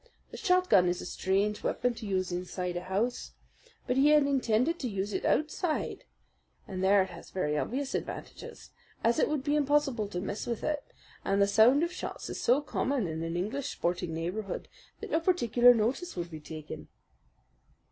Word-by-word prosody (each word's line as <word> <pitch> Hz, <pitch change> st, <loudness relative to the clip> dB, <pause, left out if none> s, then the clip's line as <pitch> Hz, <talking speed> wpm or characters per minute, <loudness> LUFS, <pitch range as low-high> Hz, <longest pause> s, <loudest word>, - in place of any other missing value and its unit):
The -, -, -8 dB
shotgun 360 Hz, -, +4 dB
is 175 Hz, +1 st, -1 dB
a -, -, -6 dB
strange 195 Hz, +4 st, 0 dB
weapon 245 Hz, 0 st, 0 dB
to 225 Hz, -2 st, -8 dB
use 185 Hz, -2 st, -1 dB
inside 180 Hz, 0 st, -3 dB
a 175 Hz, -, -2 dB
house; 210 Hz, +7 st, -2 dB, 0.5 s
but 250 Hz, -, 0 dB
he 275 Hz, +2 st, +5 dB
had 300 Hz, -1 st, +6 dB
intended 270 Hz, +3 st, +1 dB
to 255 Hz, -, -2 dB
use 200 Hz, 0 st, -3 dB
it -, -, -2 dB
outside, 310 Hz, +1 st, 0 dB, 0.6 s
and 185 Hz, -1 st, -4 dB
there 195 Hz, 0 st, +5 dB
it 190 Hz, -, -8 dB
has 170 Hz, -, -11 dB
very 150 Hz, -5 st, -1 dB
obvious 265 Hz, -, -2 dB
advantages, -, -, -6 dB, 0.3 s
as 235 Hz, +1 st, +3 dB
it -, -, +3 dB
would 300 Hz, -3 st, -1 dB
be 290 Hz, 0 st, +1 dB
impossible 285 Hz, -6 st, +2 dB
to 180 Hz, -3 st, -4 dB
miss 200 Hz, +3 st, -4 dB
with 235 Hz, -2 st, -3 dB
it, 300 Hz, -2 st, -1 dB, 0.4 s
and 195 Hz, +1 st, +1 dB
the 200 Hz, -, +6 dB
sound 225 Hz, +9 st, +5 dB
of 340 Hz, -, -1 dB
shots -, -, -6 dB
is -, -, -5 dB
so 255 Hz, +5 st, +3 dB
common 275 Hz, -4 st, -1 dB
in 160 Hz, -1 st, -4 dB
an 165 Hz, +1 st, -3 dB
English 230 Hz, +10 st, -2 dB
sporting 175 Hz, 0 st, -2 dB
neighbourhood 185 Hz, +5 st, -4 dB, 0.3 s
that -, -, -7 dB
no 320 Hz, -, +3 dB
particular 245 Hz, -, +5 dB
notice 245 Hz, +10 st, 0 dB
would 175 Hz, -1 st, -4 dB
be 155 Hz, -, -7 dB
taken." 155 Hz, 0 st, -8 dB
220 Hz, 185 wpm, -30 LUFS, 185-280 Hz, 0.6 s, had